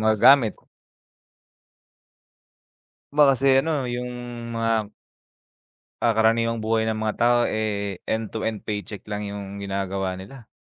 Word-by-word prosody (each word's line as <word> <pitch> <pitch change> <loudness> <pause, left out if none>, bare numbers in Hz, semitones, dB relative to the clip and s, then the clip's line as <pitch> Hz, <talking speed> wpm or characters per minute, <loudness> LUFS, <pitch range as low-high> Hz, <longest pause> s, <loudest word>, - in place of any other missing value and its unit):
magagamit. 110 +2 +5 2.6
Ma 150 - +6
kasi 135 0 +1 0.2
ano 150 -4 -1
yung 125 0 -3 0.4
mga 115 -2 0 1.1
ah, 115 - +4
karaniwang 115 +1 +2
buhay 110 0 +1
ng 110 -1 -1
mga 110 -1 -1
tao, 120 0 +4
eh, 100 -2 -2
end 110 0 -2
to 110 - -5
end 110 -2 -2
paycheck 105 -1 -4
lang 105 0 -3
yung 100 -1 -7
ginagawa 95 -1 -2
nila. 115 +4 -12
110 Hz, 120 wpm, -24 LUFS, 105-115 Hz, 2.6 s, Ma